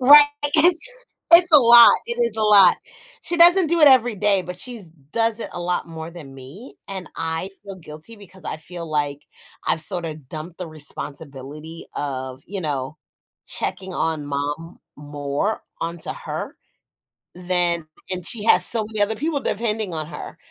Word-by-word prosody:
Right. 290 Hz, +3 st, +9 dB, 0.3 s
It's 360 Hz, +11 st, +3 dB, 0.3 s
it's 345 Hz, 0 st, +7 dB
a 300 Hz, -, +10 dB
lot. 235 Hz, -1 st, +8 dB
It 235 Hz, 0 st, -4 dB
is 235 Hz, -2 st, 0 dB
a 220 Hz, -, -1 dB
lot. 200 Hz, -4 st, +6 dB, 0.5 s
She 345 Hz, -, -1 dB
doesn't 350 Hz, +2 st, +6 dB
do 335 Hz, +1 st, +1 dB
it 295 Hz, -, +9 dB
every 245 Hz, -4 st, +4 dB
day, 195 Hz, -1 st, +1 dB
but 180 Hz, +1 st, -8 dB
she's 230 Hz, -7 st, -7 dB, 0.2 s
does 230 Hz, 0 st, 0 dB
it -, -, -5 dB
a 175 Hz, -, -6 dB
lot 180 Hz, +1 st, -2 dB
more 160 Hz, 0 st, -8 dB
than 150 Hz, -6 st, -12 dB
me. 135 Hz, -, -12 dB
And 190 Hz, -2 st, -7 dB
I 165 Hz, +3 st, -3 dB
feel 195 Hz, -2 st, -9 dB
guilty 155 Hz, +6 st, -10 dB
because 190 Hz, -4 st, -15 dB
I -, -, -4 dB
feel, 165 Hz, +2 st, -8 dB
like, 145 Hz, -1 st, -2 dB, 0.4 s
I've 160 Hz, -, +1 dB
sort 175 Hz, 0 st, +1 dB
of 155 Hz, -4 st, -8 dB
dumped 160 Hz, +3 st, -8 dB
the 180 Hz, -, -5 dB
responsibility 150 Hz, 0 st, -8 dB
of, 130 Hz, -2 st, -5 dB
you 195 Hz, 0 st, -4 dB
know, 145 Hz, -2 st, -3 dB, 0.5 s
checking 190 Hz, -1 st, -4 dB
on 160 Hz, -3 st, -2 dB
mom 145 Hz, +4 st, -4 dB, 0.2 s
more 145 Hz, +7 st, -3 dB, 0.2 s
onto 165 Hz, 0 st, -4 dB
her -, -, -7 dB, 0.8 s
than 175 Hz, -2 st, 0 dB, 0.2 s
and 180 Hz, -2 st, -4 dB
she 215 Hz, +1 st, -4 dB
has -, -, +5 dB
so 225 Hz, -2 st, +5 dB
many 215 Hz, -1 st, -6 dB
other 215 Hz, +2 st, 0 dB
people 300 Hz, +3 st, -2 dB
depending 215 Hz, -6 st, -2 dB
on 155 Hz, -1 st, -4 dB
her, 150 Hz, -1 st, -9 dB
180 Hz, 170 wpm, -22 LUFS, 155-225 Hz, 0.8 s, a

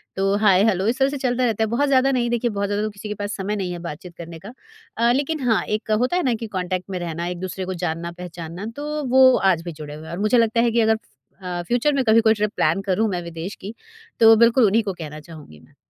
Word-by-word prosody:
तो 195 Hz, +1 st, +1 dB
hi 195 Hz, -1 st, +5 dB
hello 200 Hz, -2 st, +1 dB
इस 250 Hz, +4 st, 0 dB
तरह 270 Hz, +1 st, +3 dB
से 285 Hz, -, -4 dB
चलता 255 Hz, -1 st, 0 dB
रहता 225 Hz, -1 st, 0 dB
है, 220 Hz, -, +1 dB
बहुत 285 Hz, +5 st, +1 dB
ज़्यादा 270 Hz, 0 st, +3 dB
नहीं, 240 Hz, -2 st, 0 dB
देखिए 240 Hz, 0 st, 0 dB
बहुत 200 Hz, -1 st, -2 dB
ज़्यादा 205 Hz, +1 st, -1 dB
तो 215 Hz, -, -1 dB
किसी 205 Hz, 0 st, -9 dB
के -, -, -2 dB
पास 205 Hz, +1 st, -4 dB
समय 200 Hz, +2 st, -2 dB
नहीं 185 Hz, -3 st, -3 dB
है 175 Hz, -, -5 dB
बातचीत 170 Hz, +3 st, -10 dB
करने 165 Hz, -1 st, -9 dB
का। 230 Hz, -, -9 dB, 0.4 s
अ, 235 Hz, +1 st, +3 dB
लेकिन 290 Hz, +4 st, -1 dB
हाँ, 220 Hz, -, +3 dB
एक 215 Hz, +1 st, -3 dB
होता 250 Hz, +9 st, +1 dB
है 360 Hz, -, 0 dB
ना 250 Hz, -3 st, +1 dB
कि -, -, -4 dB
कॉन्टैक्ट 180 Hz, +1 st, -3 dB
में 185 Hz, -2 st, -3 dB
रहना, 170 Hz, 0 st, -4 dB
एक 175 Hz, 0 st, -5 dB
दूसरे 185 Hz, 0 st, -5 dB
को 185 Hz, -, -4 dB
जानना-पहचानना, 170 Hz, +2 st, -6 dB
तो 300 Hz, +1 st, -4 dB
वो 260 Hz, 0 st, +6 dB, 0.2 s
आज 165 Hz, -2 st, -1 dB
भी 175 Hz, -, -5 dB
जुड़े 150 Hz, -1 st, -9 dB
हुए 155 Hz, +1 st, -10 dB
हैं। -, -, -8 dB
और 175 Hz, -, -5 dB
मुझे 215 Hz, +4 st, +2 dB
लगता 230 Hz, 0 st, +2 dB
है 235 Hz, -1 st, +2 dB
कि 235 Hz, -, +1 dB
अगर 220 Hz, 0 st, +3 dB
फ -, -, -9 dB, 0.4 s
अ, 175 Hz, -1 st, -3 dB
फ़्यूचर 245 Hz, +5 st, +1 dB
में 270 Hz, -, +1 dB
कभी 225 Hz, +1 st, +5 dB
कोई 220 Hz, -, +6 dB
ट्रिप 210 Hz, -1 st, -1 dB
प्लान 170 Hz, +5 st, +1 dB
करूँ 195 Hz, +3 st, 0 dB
मैं 180 Hz, -2 st, -2 dB
विदेश 170 Hz, +3 st, -6 dB
की, 205 Hz, +4 st, -7 dB, 0.5 s
तो 225 Hz, 0 st, +8 dB
बिल्कुल 235 Hz, +1 st, +5 dB
उन्हीं 215 Hz, +2 st, +3 dB
को 195 Hz, -3 st, -3 dB
कहना 155 Hz, -3 st, -8 dB
चाहूँगी 150 Hz, -, -13 dB
मैं। 80 Hz, -, -23 dB
205 Hz, 270 wpm, -22 LUFS, 175-235 Hz, 0.5 s, तो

